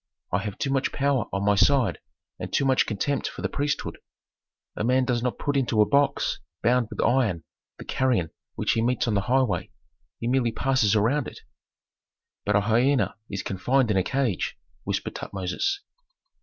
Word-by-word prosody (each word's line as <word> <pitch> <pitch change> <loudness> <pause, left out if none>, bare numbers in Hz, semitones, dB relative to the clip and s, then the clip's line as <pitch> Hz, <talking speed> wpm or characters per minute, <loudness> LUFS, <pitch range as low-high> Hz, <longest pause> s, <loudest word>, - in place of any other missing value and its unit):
I 90 - +2
have 100 0 -5
too 135 - -1
much 135 -1 +1
power 140 -4 +1
on 100 0 -1
my 105 - +4
side 115 +4 +3 0.4
and - - -5
too 140 - +1
much 130 -1 +3
contempt 130 +6 -1
for - - -7
the - - +2
priesthood. 145 0 -2 0.8
A - - -2
man 130 +2 +3
does 120 -2 0
not 125 0 -1
put 145 - -2
into 120 -5 +1
a 105 - +7
box 140 0 +1 0.2
bound 120 0 +3
with - - -9
iron 115 -10 +2 0.3
the - - -10
carrion 120 -11 0 0.2
which - - 0
he 115 - +1
meets 125 +1 +1
on 115 - +1
the 100 - +2
highway; 125 0 +1 0.5
he 115 - -4
merely 125 -2 +2
passes 125 -4 +2
around 120 +7 +2
it." - - -10 1.0
"But 105 - +1
a 105 - +4
hyena 115 +2 +2
is 100 -1 -4
confined 120 +5 +1
in 100 - +2
a - - +4
cage," 125 -2 -1 0.3
whispered - - -2
Tutmosis. 100 - -2
120 Hz, 180 wpm, -25 LUFS, 105-135 Hz, 1.0 s, a